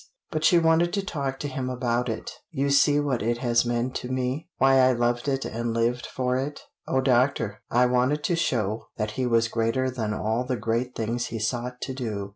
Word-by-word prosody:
But 155 -2 -2
she 175 - +6
wanted 165 +1 +3
to 200 -1 -1
talk 140 -7 -3
to 145 - -2
him 130 -2 -3
about 125 -1 -1
it. 110 - -4 0.2
"You 140 -4 -1
see 145 +1 +5
what 140 -4 0
it 120 +2 0
has 120 -1 +2
meant 120 +1 -1
to 125 - -6
me? 130 +5 -2
Why 135 0 +5
I 130 0 +5
loved 120 +1 0
it 135 -1 0
and 115 0 -3
lived 120 +1 0
for 125 -1 -1
it? 140 +3 -3 0.3
Oh 130 - +1
doctor 125 -4 +1
I 125 +1 +4
wanted 125 +4 +1
to 175 - +1
show 115 -10 -1
that 105 -1 -2
he 125 +3 -1
was 115 -1 +3
greater 115 +3 0
than 110 -4 -3
all 110 +3 -1
the 125 -1 -2
great 115 +3 -1
things 115 +2 -2
he 115 - -5
sought 120 +3 -3
to 130 - -3
do! 110 -6 -4
125 Hz, 215 wpm, -26 LUFS, 115-135 Hz, 0.3 s, she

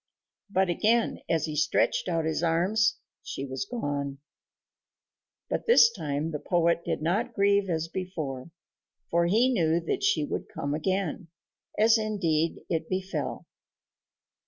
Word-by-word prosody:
But 190 -1 +2
again, 220 +7 +1
as 165 -1 +1
he 155 -2 -5
stretched 155 +4 +1
out 165 -2 0
his 160 0 -1
arms, 185 +6 +2 0.2
she 135 - -5
was 130 +6 -4
gone. 145 - -3 1.3
But - - -3
this 345 - +7
time 155 -6 -3
the 150 - -3
poet 170 0 +1
did - - -2
not 220 +8 0
grieve 200 -1 +3
as 165 -1 -1
before, 165 -7 -5 0.6
for 170 0 +3
he 235 +8 +3
knew 165 -5 +2
that 165 - -2
she 150 - +2
would - - -4
come 145 0 -3
again, 185 +2 -2 0.5
as 220 +1 +5
indeed 170 -7 0
it 160 -2 -2
befell. 185 +1 -3
170 Hz, 135 wpm, -27 LUFS, 155-200 Hz, 1.3 s, this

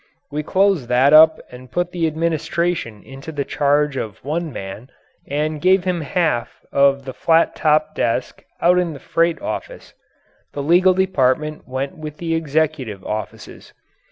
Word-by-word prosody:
We 150 +1 -2
closed 190 -4 +1
that 130 +4 +4
up 160 +1 +8
and 125 +1 -12
put 175 0 -2
the 170 -3 0
administration 160 -6 -2
into 135 +4 -10
the 145 -3 -3
charge 145 -1 +1
of 105 -6 -5
one 160 +2 -2
man 100 +5 -8 0.4
and 150 +1 -2
gave 185 +1 +4
him 180 -2 -1
half 155 -5 -2
of 140 0 +3
the 130 - -6
flat 165 +4 +2
topped 155 0 +1
desk 120 +2 -2 0.2
out 180 +1 +4
in 175 -3 -1
the 140 - -10
freight 165 +3 0
office. - - -6 0.6
The 140 - -4
legal 180 +4 +4
department 155 -5 0
went 135 +5 -4
with 150 -1 -7
the 165 -1 -3
executive 150 -9 -1
offices. 110 0 -7
155 Hz, 155 wpm, -20 LUFS, 135-170 Hz, 0.6 s, up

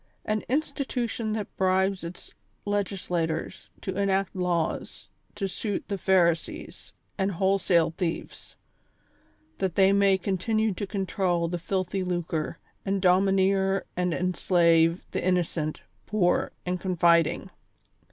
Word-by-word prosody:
An 215 0 0
institution 250 -5 -1
that 215 -2 -4
bribes 190 0 +2
its 170 +1 -9 0.3
Legislators 185 -5 -2
to 190 - -4
enact 195 -1 0
laws 175 -3 -2 0.3
to 200 -2 -2
suit 200 +1 -3
the 200 - -1
Pharisees 170 -3 0 0.3
and 195 +1 +1
wholesale 185 -3 +2
thieves, 165 0 -5 1.0
that 190 -3 -1
they 195 0 +5
may 200 -1 +4
continue 210 +3 0
to 200 +2 -4
control 185 -3 0
the 175 +1 -3
filthy 185 +1 -2
lucre, 175 -3 -2 0.3
and 195 0 0
domineer 190 +1 +3
and 180 0 0
en 180 +4 0
slave 170 -1 +3
the - - -2
innocent, 170 -4 0 0.3
poor 195 -4 +1
and 180 0 -1
confiding. 170 0 +2
190 Hz, 115 wpm, -27 LUFS, 175-195 Hz, 1.0 s, they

